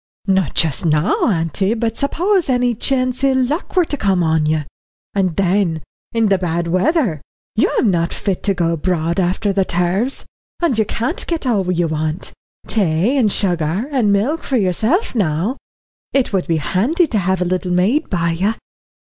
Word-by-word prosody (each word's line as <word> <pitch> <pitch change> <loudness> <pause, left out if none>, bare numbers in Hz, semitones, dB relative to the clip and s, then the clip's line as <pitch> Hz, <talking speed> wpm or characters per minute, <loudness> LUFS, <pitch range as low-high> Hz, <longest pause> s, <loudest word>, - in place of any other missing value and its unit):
"Not 190 -6 +1
just 160 -2 +1
now, 155 -1 +2 0.2
auntie, 190 +4 0
but 225 -1 -1
suppose 350 - 0
any 245 -1 +2
chance 255 +2 -1
ill 270 -1 +3
luck 280 +10 -1
were 360 -2 +4
to 295 - -3
come 195 -8 +1
on 160 -1 +2
you. 155 0 +1 0.5
And 185 -4 0
then, 185 -4 +1 0.3
in 225 -2 +1
the 195 -1 +3
bad 170 -1 -1
weather, 185 - +1 0.3
you'm 220 -1 +2
not 170 -1 0
fit 195 -3 -2
to 200 -2 +1
go 170 -2 +1
abroad 170 +1 -1
after 190 +3 0
the 195 0 +2
turves, 185 +9 -1 0.3
and 335 -7 +1
you 220 - +3
can't 240 - -3
get 330 -4 -2
all 200 -7 +1
you 175 -1 +1
want 155 +2 -3 0.3
tay 195 - +1
and 230 -7 +3
sugar 175 - 0
and 240 -7 +2
milk 240 +12 +1
for 265 - -1
yourself 220 - +1
now. 195 - 0 0.6
It 270 -6 +1
would 190 -2 0
be 165 - +1
handy 230 - +1
to 230 -9 -1
have 190 0 0
a 180 - 0
little 180 0 -1
maid 195 +12 +1
by 170 -3 0
you." 195 +7 0
195 Hz, 175 wpm, -18 LUFS, 170-245 Hz, 0.6 s, were